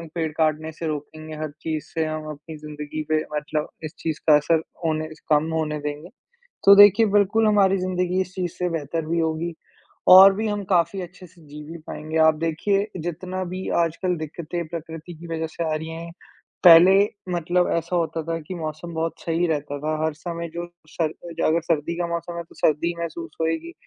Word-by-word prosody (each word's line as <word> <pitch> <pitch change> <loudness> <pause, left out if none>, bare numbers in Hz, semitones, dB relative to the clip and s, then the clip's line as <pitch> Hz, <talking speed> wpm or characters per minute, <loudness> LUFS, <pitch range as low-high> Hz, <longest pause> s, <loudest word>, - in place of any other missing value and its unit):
पेड़ 160 -2 -1
काटने 155 0 +1
से 160 +1 -5
रोकेंगे, 155 +1 -6
हर 155 -1 -4
चीज़ 155 -2 -3
से 160 -1 0
हम 155 0 -4
अपनी 150 +2 -10
ज़िंदगी 150 0 -6
पे 155 0 +2
मतलब 150 0 -2 0.2
इस 155 - -6
चीज़ 160 -2 -3
का 150 - +9
असर 155 +2 +2 0.2
होने 155 -1 -1
स - - -21
कम 155 +1 +3
होने 155 -1 -1
देंगे, 150 +3 -5 0.6
तो 200 - +10
देखिए 205 +2 +8
बिल्कुल 205 +2 +3
हमारी 195 -2 +4
ज़िंदगी 180 0 0
इस 185 0 -4
चीज़ 180 -2 -2
से 180 - 0
बेहतर 160 0 -3
भी 170 +2 0
होगी, 165 +1 -1 0.5
और 190 +2 +10
भी 220 +3 -2
हम 205 -1 -2
काफ़ी 175 +1 +2
अच्छे 180 +1 -11
से 175 0 -21
जी 150 +1 -9
भी 165 +3 -8
पाएँगे। 155 +1 -6
आप 160 - +5
देखिए, 165 +6 0 0.2
जितना 180 +3 -4
भी 185 +1 -5
आजकल 170 +2 -1
दिक्कतें 160 +2 -5
प्रकृति 165 +1 -7
की 165 +2 -11
वज़ह 160 0 -2
से 165 +1 -5
आ 160 -1 0
रही 160 +1 -4
हैं, 165 +1 -7 0.5
पहले 175 +2 +9 0.4
मतलब 175 +1 +1
ऐसा 170 +2 -1
होता 165 -1 -1
था 165 +1 -2
कि 160 +4 -8
मौसम 160 0 -6
बहुत 160 0 -1
सही 170 +1 0
रहता 145 -2 -2
था। 155 +1 -1
हर 160 - +1
समय 170 +1 -5
जो 170 0 -4 0.2
सर 170 - -1
अ, 170 +1 -4
अगर 165 +2 +2
सर्दी 165 0 -1
का 175 - 0
मौसम 170 0 -4
है, 170 - -3
तो 165 - -20
सर्दी 155 +2 +2
ही 170 - -3
महसूस 340 - -5
होएगी, 165 - -2
165 Hz, 200 wpm, -23 LUFS, 155-175 Hz, 0.6 s, तो